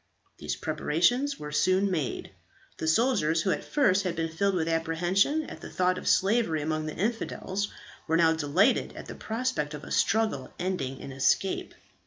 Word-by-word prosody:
These 75 0 -3
preparations 175 - +1
were 150 0 -7
soon 185 +6 +2
made. 155 -8 -3 0.5
The 160 - -3
soldiers, 165 -5 +2
who 190 - +1
at - - -2
first 205 -10 +2
had 180 -3 -2
been 165 0 -1
filled 195 +4 +1
with 165 -2 0
apprehension 175 - +1
at - - -10
the - - -8
thought 185 0 +1
of - - -8
slavery 195 -6 +2
among 155 0 -2
the 155 - -5
infidels, 205 -1 -2 0.4
were 165 0 +2
now 165 -1 +5
delighted 160 +5 +2
at - - -8
the - - -7
prospect 220 -11 -2
of 150 - -9
a - - -10
struggle 220 -12 +1
ending 170 -8 -3
in - - -7
escape. 135 +8 0
175 Hz, 175 wpm, -28 LUFS, 155-200 Hz, 0.5 s, now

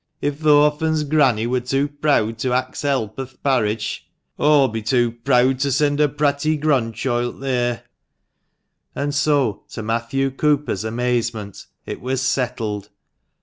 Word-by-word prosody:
If 145 0 -2
the 155 -1 +3
orphan's 150 +1 +2
granny 140 -7 +2
wur 125 +2 0
too 135 +3 0
preawd 145 -7 0
to 125 +1 -1
ax 130 0 -2
help 135 -6 -1
o' 135 - -2
th' 130 - -23
parish, 110 -6 0 0.4
aw'll 145 -2 +5
be 110 -2 -4
too 120 +1 +1
preawd 125 +1 +3
to 140 0 +1
send 145 +2 +1
her 150 - +5
pratty 145 +2 0
grandchoilt 120 -4 -1
theer." 125 -3 -1 1.1
And 145 0 -2
so, 140 -7 +1
to 110 - -6
Matthew 115 +5 -1
Cooper's 145 -6 0
amazement, 115 -3 -2 0.2
it - - -6
was 130 +1 -2
settled. 110 -6 -2
130 Hz, 145 wpm, -21 LUFS, 115-145 Hz, 1.1 s, aw'll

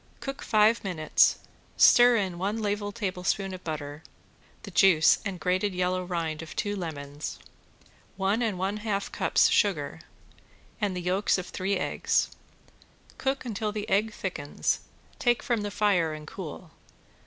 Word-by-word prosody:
Cook 275 0 -6
five 215 +2 +3
minutes; 170 -6 +3 0.4
stir 245 0 +7
in 190 -5 -1
one 205 +4 -1
level 205 -1 -2
tablespoon 195 -2 -2
of 185 - -8
butter, 150 -2 -5 0.6
the - - -8
juice 170 -5 +5
and 195 -4 -4
grated 185 +2 0
yellow 180 0 0
rind 165 -3 -3
of 160 - -9
two 205 0 -1
lemons, 145 -5 -6 0.8
one 195 +4 +1
and 220 -5 0
one 195 +3 -1
half 210 -2 -2
cups - - +3
of - - +1
sugar, - - +1 0.8
and 200 -3 0
the - - -3
yolks 190 +4 +1
of 185 - -4
three 195 +2 -1
eggs. - - 0 0.9
Cook 270 0 -1
until 215 -2 -2
the 210 0 -4
egg 215 +3 +2
thickens, 180 -8 -2 0.4
take 240 -2 +2
from 235 -3 0
the 205 - -3
fire 190 -6 +1
and 155 0 -9
cool. 165 0 -8
195 Hz, 150 wpm, -27 LUFS, 175-210 Hz, 0.9 s, stir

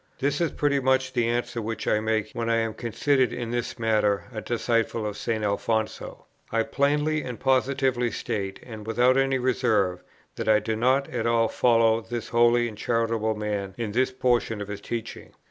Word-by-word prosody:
This 145 +3 0
is 170 - +1
pretty 145 -1 +1
much 130 0 +1
the 120 -2 +1
answer 120 0 -1
which 110 -1 -4
I 105 - +3
make, 110 -1 -1
when 115 -1 -2
I 115 - +3
am 115 -1 0
considered 125 +4 +1
in 120 -2 -4
this 120 0 -3
matter 105 -3 +1
a 110 - -4
disciple 115 -1 -1
of 105 -1 -3
St. 110 0 -2
Alfonso. 110 +2 -2 0.3
I 115 0 +2
plainly 150 +4 +1
and 125 -4 -6
positively 130 -2 +1
state, 100 -5 -4
and 110 -3 -9
without 125 +3 +3
any 135 0 +2
reserve, 100 -7 +1 0.4
that - - -2
I 110 - +6
do 110 +1 -2
not 130 +5 +2
at 115 -2 -2
all 115 -1 +3
follow 115 -2 +3
this 115 +1 -5
holy 120 0 +4
and 105 -2 -9
charitable 115 -2 0
man 105 -2 -3
in 115 -3 -3
this 130 +5 +2
portion 120 -4 0
of 100 0 -6
his 100 -1 -6
teaching. 115 -2 -6
115 Hz, 185 wpm, -25 LUFS, 110-130 Hz, 0.4 s, I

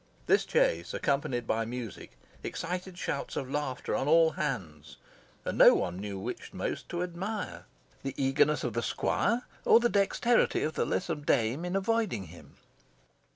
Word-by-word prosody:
This - - +3
chase, - - +1
accompanied 135 -4 0
by 115 0 0
music, 115 -1 -7 0.2
excited 180 +2 -4
shouts 140 - -3
of 135 -1 -4
laughter 145 -3 -2
on 135 - -1
all 165 +1 +6
hands, 80 - -4 0.5
and - - -3
no - - +9
one 90 +1 -2
knew 100 -1 -5
which 115 +6 -6
most - - -4
to 175 0 -2
admire, 190 +5 -4 0.4
the 135 -1 -4
eagerness 135 +2 +2
of 125 - -2
the 115 - 0
squire, 235 - 0 0.2
or - - +7
the 240 0 +2
dexterity 210 +4 +2
of 155 - -1
the - - 0
lissom 165 -5 -1
dame 125 +1 +1
in 180 +1 -2
avoiding 200 - 0
him. 85 - -15
145 Hz, 155 wpm, -30 LUFS, 120-180 Hz, 0.5 s, no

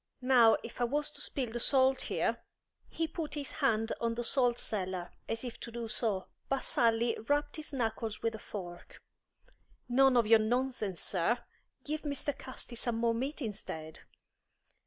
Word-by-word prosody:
Now, 245 -3 +6
if 235 - -7
I - - +4
was 290 +5 -1
to - - -10
spill 255 -5 -1
the 240 - -3
salt 265 +1 +4
here - - 0 0.3
" - - -56
He 325 - -1
put 315 -1 -5
his 285 -2 -3
hand 225 -6 +1
on 230 -1 +1
the 240 - -2
salt 245 -1 +3
cellar, 185 -5 -3 0.2
as 225 +1 -2
if 245 -2 -6
to 235 - -7
do 235 0 -4
so, 215 -4 -1 0.2
but 270 -1 0
Sally 230 0 +3
rapped 290 +1 +1
his 305 -1 -5
knuckles 225 -4 -2
with 230 0 +1
a 220 - -6
fork. 175 -4 -8 0.9
"None 260 +1 +5
of 235 - +5
your 225 +1 +7
nonsense, 220 -5 0
sir! 195 +6 +1 0.5
Give 305 +1 -3
Mr. 290 -1 -2
Casti 255 -1 -8
some 235 0 -1
more 230 0 +2
meat, 270 +5 -2
instead." 160 -7 -5
235 Hz, 175 wpm, -32 LUFS, 225-270 Hz, 0.9 s, your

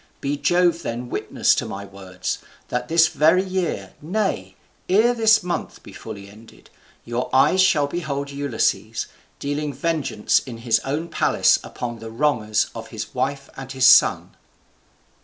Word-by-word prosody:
Be 140 +1 -2
Jove 175 +2 +2
then 120 -3 -5
witness - - +1
to - - -1
my 100 +1 -6
words, 95 -2 -5 0.3
that 125 0 -2
this 165 0 +5
very 165 +6 +3
year, 180 - -3
nay, 155 - -2 0.3
ere 220 +6 +4
this 220 -3 +4
month 175 -1 -4
be - - -12
fully 100 -3 -9
ended, 110 +3 -17 0.3
your 120 +2 -3
eyes 160 +8 +4
shall 160 -6 +4
behold 140 -3 -4
Ulysses, 140 -4 -1 0.3
dealing 145 +1 -3
vengeance 145 -5 0
in 120 -3 -9
his 115 -1 +3
own 145 +7 -3
palace - - +3
upon 120 -2 -6
the 115 - -8
wrongers 115 -4 0
of - - -8
his - - -7
wife 140 -1 -2
and 135 0 -8
his 130 -1 +2
son." 130 - +5
140 Hz, 150 wpm, -22 LUFS, 115-170 Hz, 0.3 s, this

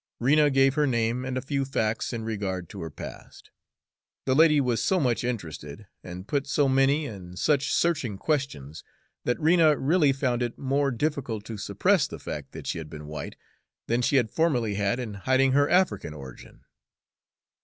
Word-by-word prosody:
Rena 150 +4 +4
gave 135 -1 +4
her 150 0 +2
name 115 0 0
and 130 0 -3
a 130 - -3
few 140 0 -1
facts 115 -5 -1
in 115 -2 -4
regard 100 -5 -3
to 100 - -8
her 80 - -5
past. - - -11 0.7
The 130 - +2
lady 150 +1 +5
was 125 -4 0
so 190 - +2
much 125 -6 0
interested, 85 -7 -5 0.2
and 90 +2 -8
put 140 -1 -1
so 140 0 +2
many 135 +3 +3
and 90 -7 -9
such 145 +2 +1
searching 140 - 0
questions, 130 - -3 0.4
that 120 - 0
Rena 160 -2 +4
really 150 0 +3
found 130 -3 -1
it 120 -1 -2
more 140 +1 +1
difficult 125 -5 -2
to 115 - -6
suppress - - +2
the - - -8
fact - - -7
that - - -8
she - - -2
had 80 -2 -8
been 75 0 -9
white, 75 +1 -7 0.5
than 120 +2 0
she 130 +4 +1
had 120 -5 +2
formerly 125 -10 +1
had 100 +4 0
in 115 -4 -5
hiding 130 +6 +2
her 145 +2 +3
African 180 - +1
origin. 65 -4 -12
125 Hz, 180 wpm, -26 LUFS, 105-145 Hz, 0.7 s, lady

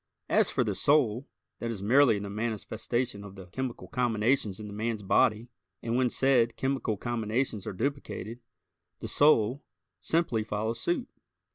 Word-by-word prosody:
As - - +4
for - - +1
the - - -1
"soul," 135 -4 +2 0.3
that 115 - -3
is 105 -4 -5
merely 120 0 +5
the 100 0 -5
manifestation 110 +1 -3
of 100 -1 -10
the 95 -2 -10
chemical 125 +7 -5
combinations 115 -4 0
in 110 - -7
the 105 - -8
man's 110 0 -2
body, 110 +3 +2 0.4
and 115 0 -1
when 125 0 +3
said 120 -3 +3
chemical 130 -5 -1
combinations 115 -1 -2
are - - -3
duplicated, 120 -2 -4 0.6
the - - -5
"soul" 140 -3 +3 0.4
simply 160 -10 0
follows 110 +2 -3
suit. 175 +9 -1
115 Hz, 150 wpm, -29 LUFS, 105-130 Hz, 0.6 s, merely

